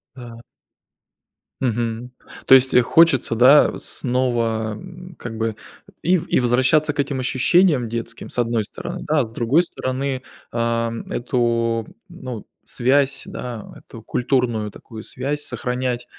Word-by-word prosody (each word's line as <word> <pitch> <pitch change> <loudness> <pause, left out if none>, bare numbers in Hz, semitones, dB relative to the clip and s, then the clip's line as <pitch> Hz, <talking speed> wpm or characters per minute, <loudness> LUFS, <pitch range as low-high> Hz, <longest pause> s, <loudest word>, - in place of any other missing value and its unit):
Да. 120 -3 -10 1.2
Мгм. 120 0 -2 0.3
То - - +6
есть, 130 0 +4
э, 125 - +7
хочется, 150 -3 +4
да, 130 +5 +6
э - - -6
снова, 115 -4 -1
м, 180 - -11
как 115 -2 -7
бы 110 -1 -2 0.5
и 180 +2 +3
в - - -6
и - - +2
возвращаться 130 +5 +3
к 145 - -10
этим 140 -1 -1
ощущениям 130 +1 +3
детским 115 0 -6
с - - -6
одной 115 -2 +1
стороны, 100 - -7
да, 155 0 +2
а 135 - +3
с 110 - -12
другой 125 +9 +2
стороны 130 -4 -3 0.3
ам, 115 0 -1
эту 115 -2 0 0.2
ну 130 - -8 0.2
связь, 140 +2 +2
да, 120 -3 -7
эту 115 -1 -13
культурную 120 -4 0
такую 110 +2 -11
связь 145 +3 -3
сохранять 125 -2 -2
125 Hz, 140 wpm, -21 LUFS, 115-140 Hz, 1.2 s, э